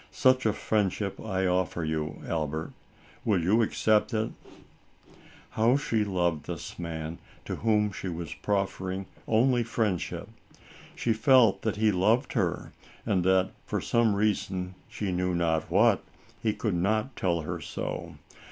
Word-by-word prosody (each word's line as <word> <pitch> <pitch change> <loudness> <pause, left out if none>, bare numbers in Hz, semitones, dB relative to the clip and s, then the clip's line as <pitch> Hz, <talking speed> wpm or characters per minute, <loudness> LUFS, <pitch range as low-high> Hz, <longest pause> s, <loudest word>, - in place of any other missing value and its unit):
Such 130 -2 +3
a 110 - +2
friendship 100 -2 -1
I 95 -3 -1
offer 90 -2 0
you, 80 -1 -3
Albert. 80 -1 -2 0.5
Will 105 -5 +2
you 100 +8 +3
accept 110 +1 +2
it? 110 +1 0 0.6
" - - -24
How 115 +5 +3
she 115 -7 0
loved 85 -6 0
this - - -6
man, 80 -1 -5 0.3
to - - -4
whom 105 -2 +2
she 95 - -6
was 85 -2 -4
proffering 95 -1 -2 0.2
only 120 +2 +3
friendship. 110 -6 -1 0.7
She 115 - +1
felt 110 -4 +5
that 110 - -1
he 110 0 +3
loved 110 +8 +2
her - - -1 0.3
and 95 -3 +1
that, 95 0 +3 0.2
for - - -1
some 115 -3 +2
reason, 95 -3 0 0.2
she 100 -3 -3
knew 90 0 0
not 80 -2 0
what, - - +4 0.4
he 110 - +2
could 105 -1 -2
not 110 +8 0
tell 85 -3 0
her 75 - -4
so. - - -5
100 Hz, 145 wpm, -28 LUFS, 90-110 Hz, 0.7 s, felt